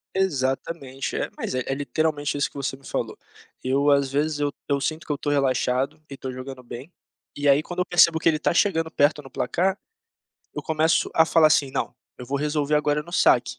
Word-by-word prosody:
Exatamente, 135 -5 -2
é, - - -2
mas - - -4
é 130 - -1
é 135 - -1
literalmente 145 0 -1
isso 140 - +1
que - - -30
você 135 -1 -3
me 135 - -20
falou. - - -3 0.5
Eu, 140 +3 +2
às 140 -2 +3
vezes, 150 +1 0
eu 145 -1 0 0.2
eu 140 - +2
sinto 155 +3 -3
que - - -2
eu 145 - -1
tô 145 - -2
relaxado 130 -1 +1
e 140 - -8
tô 130 -1 -6
jogando 130 0 -8
bem, 125 +6 -9 0.4
e 145 0 +1
aí, 140 +2 +5
quando 175 +2 -6
eu 180 - +2
percebo 170 -2 +5
que 165 - +3
ele 155 - +1
tá 155 - 0
chegando 165 -3 +2
perto 150 0 +2
no 135 - -13
placar, 185 +11 0 0.8
eu - - -4
começo 160 +1 +2
a 160 - +6
falar 160 0 +5
assim: 140 -3 +3
"Não, 125 - -3 0.2
eu 125 - -8
vou 140 +3 -1
resolver 150 0 0
agora 150 0 +2
no 170 +3 -11
saque." 125 -7 +3
145 Hz, 215 wpm, -24 LUFS, 135-160 Hz, 0.8 s, a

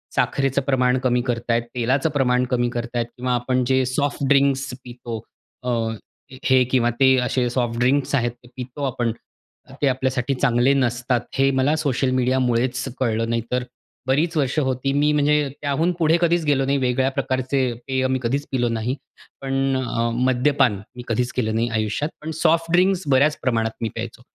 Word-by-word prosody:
साखरेचं 135 0 +1
प्रमाण 130 -2 +2
कमी 125 -1 +2
करत 120 -1 -1
आहेत, 115 0 +2
तेलाचं 130 +5 +1
प्रमाण 125 -3 +1
कमी 120 -1 +1
करत 120 0 -5
आहेत 120 -1 +1
किंवा 125 0 -1
आपण 125 +1 0
जे 130 0 +3
सॉफ्ट 140 +3 -1
ड्रिंक्स 135 -2 +2
पितो 120 -2 -7 0.4
अ, 125 - -2 0.8
हे 130 -1 +5
किंवा 120 -2 +3
ते 130 -1 +6
असे 125 0 0
सॉफ्ट 120 -1 -1
ड्रिंक्स 135 +3 +2
आहेत 120 -3 +1
ते - - -15
पितो 130 +3 -6
आपण. 120 -3 -1 0.6
तर - - -13
ते 140 - +3
आपल्यासाठी 130 0 0
चांगले 125 +2 +3
नसतात. 120 -2 0 0.2
हे 135 0 +4
मला 135 +3 +2
सोशल 135 -3 0
मीडियामुळेच 125 0 +1 0.2
कळलं, 115 -2 0
नाही 115 0 0
तर 125 0 0 0.4
बरीच 155 +6 +1
वर्ष 140 0 0
होती 130 -1 -1
मी 145 +1 +3
म्हणजे 150 0 +2
त्याहून 155 +4 +1
पुढे 165 0 +4
कधीच 170 0 +2
गेलो 140 -2 +2
नाही. 140 +1 +1
वेगळ्या 130 +1 +1
प्रकारचे 130 +1 -1 0.3
पेय 130 0 0
मी 130 0 0
कधीच 140 +5 -1
पिलो 120 -3 +1
नाही. 115 +3 -2 0.5
पण 135 0 0
अ, 115 -2 -1
मद्यपान 125 -2 +2 0.2
मी 125 - -8
कधीच 120 +2 0
केलं 110 -3 0
नाही 115 +1 +1
आयुष्यात. 110 +8 -1
पण 160 +1 -5
सॉफ्ट 165 0 +2
ड्रिंक्स 185 +1 +3
बऱ्याच 145 +3 +4
प्रमाणात 115 -3 +1
मी 115 - -1
प्यायचो. 115 +1 -6
130 Hz, 175 wpm, -22 LUFS, 120-140 Hz, 0.8 s, ते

